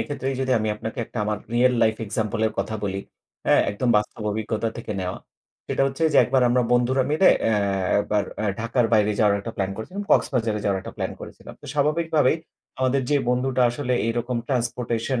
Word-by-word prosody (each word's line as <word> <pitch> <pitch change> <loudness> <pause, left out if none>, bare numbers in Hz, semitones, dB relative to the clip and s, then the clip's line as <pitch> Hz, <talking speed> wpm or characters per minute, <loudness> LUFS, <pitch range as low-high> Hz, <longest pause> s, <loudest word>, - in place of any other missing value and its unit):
এক্ষেত্রেই 135 -2 -3
যদি 130 -1 +1
আমি 110 0 -1
আপনাকে 110 +1 -6
একটা - - -7
আমার 105 0 -1 0.2
রিয়াল 125 +1 +4
লাইফ 110 -1 +3
এক্সাম্পল 110 +1 -2
এর 110 - -2
কথা 110 - -2
বলি, 95 -1 -2 0.5
হ্যাঁ, - - +5
একদম 105 +5 -2
বাস্তব 105 +1 -2
অভিজ্ঞতা 110 +1 -2
থেকে 115 -2 -5
নেওয়া। 90 0 -4 0.5
সেটা - - 0
হচ্ছে 135 +4 -4
যে - - +3
একবার 130 0 +2
আমরা 125 +1 +3
বন্ধুরা 125 +2 +3
মিলে 160 +5 +5 0.2
অ্যা 110 - +3 0.5
একবার 105 0 0 0.2
অ্যা 110 - -1
ঢাকার 115 0 +1
বাইরে 105 -1 +4
যাওয়ার 105 -2 +4
একটা 115 +3 -6
প্ল্যান 95 -1 -1
করেছিলাম। 185 - -6
কক্সবাজারে 115 -6 +2
যাওয়ার 100 -2 +1
একটা - - -9
প্ল্যান - - -3
করেছিলাম। - - -10
তো - - -11
স্বাভাবিকভাবেই 150 0 +2 0.4
আমাদের 130 +1 +2
যে 145 - +4
বন্ধুটা 125 +1 +1
আসলে 125 +1 -2
এইরকম 120 +1 -1
ট্রান্সপোর্টেশন 120 -1 -1
120 Hz, 185 wpm, -24 LUFS, 110-130 Hz, 0.5 s, হ্যাঁ